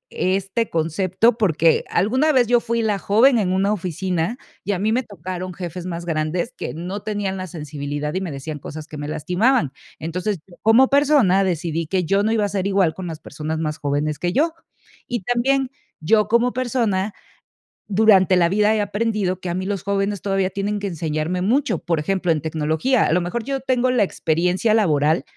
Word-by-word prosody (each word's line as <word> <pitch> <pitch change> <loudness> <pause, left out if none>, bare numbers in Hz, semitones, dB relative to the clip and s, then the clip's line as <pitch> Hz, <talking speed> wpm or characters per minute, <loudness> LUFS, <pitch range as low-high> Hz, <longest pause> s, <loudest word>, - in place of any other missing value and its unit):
este 195 +5 0
concepto, 185 +8 +1
porque 165 -6 +3
alguna 255 - +2
vez 255 -4 +4
yo 240 +1 +4
fui 235 0 -1
la 210 -2 0
joven 235 +6 +4
en 185 -4 0
una 195 +2 +2
oficina 180 +2 -2 0.3
y 205 - -1
a - - -1
mí 215 +3 +1
me 245 +3 +2
tocaron 185 -4 -6
jefes 180 0 -6
más 170 -1 -5
grandes, 160 +1 -2
que - - -5
no 180 +5 -5
tenían 205 -2 -2
la 185 0 -5
sensibilidad 150 -2 -5
y 185 - -2
me 180 -4 -4
decían 145 +2 -6
cosas 155 +2 -8
que 155 - -9
me 145 0 -5
lastimaban. 180 - +1 0.2
Entonces, 180 +5 -3
yo 180 - -17
como 230 +4 +5
persona, 275 -10 +4
decidí 165 -3 -2
que 185 +2 0
yo 195 +4 +2
no 215 +2 +1
iba 220 -2 +2
a - - -2
ser 195 -1 -1
igual 190 -5 +2
con 185 +2 -6
las 160 -2 -6
personas 155 +2 -5
más 155 -1 -2
jóvenes 145 +1 -1
que 175 +2 -1
yo. 315 +5 +2 0.5
Y 240 -3 -2
también 260 +4 +1 0.3
yo 210 +7 +3
como 235 +2 +2
persona, 225 -6 0 0.8
durante 195 -3 +5
la 170 -2 +4
vida 210 +3 +3
he 215 - +1
aprendido 205 -3 -1
que 185 - -7
a - - -1
mí 185 +1 -3
los 195 -2 -3
jóvenes 200 0 -1
todavía 195 -2 0
tienen 200 +2 -2
que 200 - -3
enseñarme 165 0 -2
mucho, 260 +9 +1
por 165 -2 -1
ejemplo, 180 +1 0
en 155 - -3
tecnología. 160 - +1
A - - +1
lo 180 - +3
mejor 180 +7 -3
yo 275 0 -2
tengo 255 -1 +1
la 245 -4 +3
experiencia 180 +4 +1
laboral, 155 -7 +2
190 Hz, 195 wpm, -21 LUFS, 165-220 Hz, 0.8 s, como